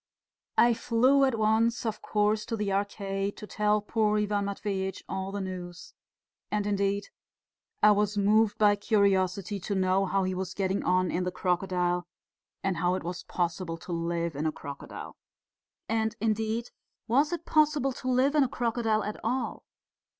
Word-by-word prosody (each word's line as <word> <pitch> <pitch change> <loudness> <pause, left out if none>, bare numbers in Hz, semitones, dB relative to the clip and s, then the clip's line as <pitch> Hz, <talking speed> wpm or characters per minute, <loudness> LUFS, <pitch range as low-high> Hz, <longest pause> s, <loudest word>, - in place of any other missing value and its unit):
I 240 0 +6
flew 255 +5 +3
at 260 -4 0
once, 220 +2 +2
of 215 -1 -2
course, 210 0 +1
to 230 - -2
the 205 -2 -1
Arcade 195 0 -2
to - - -7
tell 210 0 +1
poor 215 -1 +1
Ivan 205 -1 0
Matveitch 195 -1 -3
all 190 0 -3
the 200 0 -3
news. 180 -2 -7 0.6
And, 210 -1 -1
indeed, 200 0 0 0.7
I 210 - +8
was 205 0 +1
moved 210 +1 +3
by 205 -1 +4
curiosity 200 -2 +1
to 200 +2 -3
know 190 +1 +2
how 195 +1 +1
he 185 0 -1
was 185 0 -4
getting 195 0 0
on 185 0 +2
in 180 - 0
the 180 - -1
crocodile 180 -1 0 0.6
and 190 -3 0
how 175 +2 +1
it - - -4
was 175 +1 -5
possible 170 -1 -2
to 175 - -9
live 170 -1 -2
in 150 +3 -1
a - - +1
crocodile. 140 -2 -9 0.7
And, 220 0 0
indeed, 220 +2 -1 0.4
was 280 +7 +3
it 340 -1 -4
possible 300 -3 +2
to 255 - -7
live 255 +3 +3
in 300 -2 +5
a 260 - 0
crocodile 230 -4 0
at 210 - -5
all? 250 +4 -2
205 Hz, 165 wpm, -28 LUFS, 185-220 Hz, 0.7 s, I